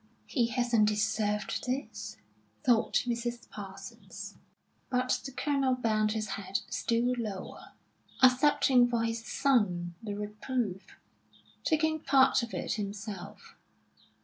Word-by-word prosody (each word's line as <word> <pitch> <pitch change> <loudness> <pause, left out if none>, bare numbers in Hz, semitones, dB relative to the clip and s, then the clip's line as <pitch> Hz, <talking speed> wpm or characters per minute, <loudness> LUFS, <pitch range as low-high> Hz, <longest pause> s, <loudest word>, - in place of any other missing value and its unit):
"He 240 -6 +1
hasn't 240 -3 +2
deserved 210 +1 0
this," 260 +3 -4 0.5
thought 240 -3 +3
Mrs. 240 0 -3
Parsons. 195 0 -9 0.5
But 255 0 +1
the 270 - -6
Colonel 275 -1 +1
bent 215 -3 +1
his 215 -2 -2
head 195 0 -2
still 240 +2 +1
lower, 205 -5 -6 0.5
accepting 255 -1 +6
for 235 -1 0
his 230 0 -2
son 205 -10 +1
the 205 -2 -4
reproof, 210 -1 -3 0.7
taking 315 0 +2
part 270 -2 +4
of 235 -1 -5
it - - -2
himself. 200 -2 -6
230 Hz, 110 wpm, -30 LUFS, 205-255 Hz, 0.7 s, accepting